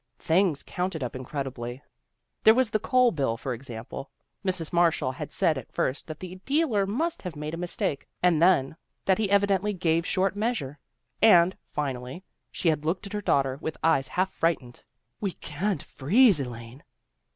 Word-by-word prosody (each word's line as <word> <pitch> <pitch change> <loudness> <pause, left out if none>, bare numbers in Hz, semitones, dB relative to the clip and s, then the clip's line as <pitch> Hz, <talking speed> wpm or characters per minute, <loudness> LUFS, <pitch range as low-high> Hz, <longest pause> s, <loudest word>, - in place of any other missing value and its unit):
Things 165 -3 +2
counted 180 -5 -3
up 125 - -4
incredibly. 130 -1 -5 0.6
There 220 - +7
was 255 -3 +2
the 215 - +1
coal 250 +2 +3
bill, 135 -8 -1
for 130 +2 -3
example. 120 +2 -8 0.3
Mrs. 180 -4 -2
Marshall 165 -6 +3
had 130 - -7
said 155 -5 +2
at 125 - -13
first 130 +5 -2
that 155 - -7
the 185 0 -8
dealer 270 -9 +1
must 315 +12 -1
have 180 -4 -6
made 150 +1 -5
a - - -3
mistake, 170 -5 -2 0.2
and 170 -3 +4
then, 165 -6 +4 0.3
that 190 0 +3
he 210 -3 +1
evidently 200 0 +2
gave 170 -3 +1
short 190 +2 0
measure, 205 - -2 0.4
and, 185 -4 +6
finally, 135 +3 -4 0.3
she - - -2
had 155 -2 0
looked 170 +5 -1
at 200 - -8
her 210 - -2
daughter 135 -6 +1
with 160 - -4
eyes 155 -5 +3
half 185 +1 0
frightened. 135 -8 -1 0.2
" - - -49
We 195 -4 -1
can't 170 +2 -3
freeze, 200 - +4
Elaine." 120 0 -7
165 Hz, 175 wpm, -27 LUFS, 135-195 Hz, 0.6 s, There